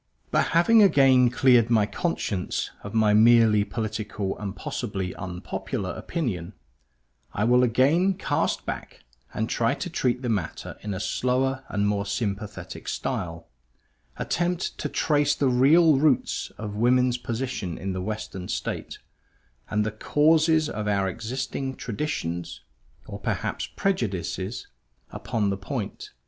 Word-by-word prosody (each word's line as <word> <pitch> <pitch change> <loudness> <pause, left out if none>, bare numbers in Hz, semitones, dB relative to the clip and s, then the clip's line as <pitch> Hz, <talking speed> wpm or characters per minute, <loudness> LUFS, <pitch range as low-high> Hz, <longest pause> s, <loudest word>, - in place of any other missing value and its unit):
But - - +2
having 220 +6 +6
again 135 -9 +6
cleared 120 -2 +4
my 110 -3 +4
conscience 110 - -2
of 100 +2 -8
my 110 -2 +4
merely 110 -1 +6
political 105 -1 -3
and 100 -1 -5
possibly 95 -1 -4
unpopular 90 -2 -4
opinion, 105 - -4 0.8
I 100 - -1
will 125 +2 +5
again 140 +11 +3
cast - - -1
back - - -6 0.3
and 110 - -2
try 115 0 +1
to 180 - -5
treat 125 -4 0
the - - -1
matter 100 -8 -3
in 105 -2 -4
a - - -4
slower 130 +6 0
and 105 0 0
more 100 -1 -1
sympathetic 100 0 -4
style; 85 -1 -3 0.7
attempt 175 +1 -1
to - - -2
trace 145 -2 +2
the 140 -2 +2
real 150 +6 +5
roots 145 -3 +1
of 105 -1 -5
woman's 125 +3 +2
position 120 -7 -3
in 95 +2 -3
the 95 - -3
western 100 -2 -5
state, - - -4 0.7
and 105 0 +1
the 110 - -1
causes 155 +7 +3
of 105 -6 -4
our 100 -2 +1
existing 130 +6 -4
traditions 100 - -4 0.4
or - - -8
perhaps - - -2
prejudices 100 - -2 0.5
upon 105 -3 -1
the 100 - -2
point. 95 -3 -5
115 Hz, 130 wpm, -25 LUFS, 100-135 Hz, 0.8 s, having